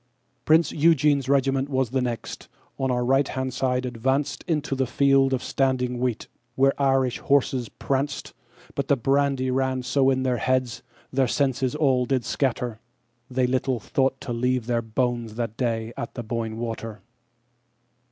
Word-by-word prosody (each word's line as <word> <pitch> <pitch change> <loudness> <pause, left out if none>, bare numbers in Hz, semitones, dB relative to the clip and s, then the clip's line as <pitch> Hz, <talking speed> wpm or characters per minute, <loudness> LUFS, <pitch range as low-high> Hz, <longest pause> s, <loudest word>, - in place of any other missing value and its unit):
Prince 160 +2 +4
Eugene's 150 -3 +3
regiment 135 0 +2
was 130 -4 0
the 130 0 +1
next, 120 -3 -4 0.3
on 135 -1 0
our 125 -1 0
right 135 +2 +3
hand 130 0 -3
advancedInto 130 +3 -1
a 130 - +1
field 135 +1 +3
of 130 -1 -1
standing 125 -2 0
wheat, 125 -3 -2 0.3
where 135 +1 +4
Irish 135 -2 +2
horses 130 -4 +1
pranced; 140 +1 -3 0.4
But 140 -1 -2
the 140 - +4
brandy 135 0 +1
ran 130 0 0
so 135 +1 +2
in 130 -1 +1
their 125 -2 +1
heads, 130 -1 0 0.3
their 130 -1 +2
senses 135 0 0
all 130 -5 +2
did 130 -3 0
scatter, 125 -4 -1 0.5
They 130 0 +1
little 130 0 0
thought 135 +3 0
to 120 - -4
leave 125 0 0
their 120 -1 0
bones 115 0 -2
that 115 -2 -3
day 115 -2 -2
at 120 - -6
the 120 - -4
Boyne 115 -1 -3
Water. 115 -2 -5
130 Hz, 150 wpm, -25 LUFS, 120-135 Hz, 0.5 s, Prince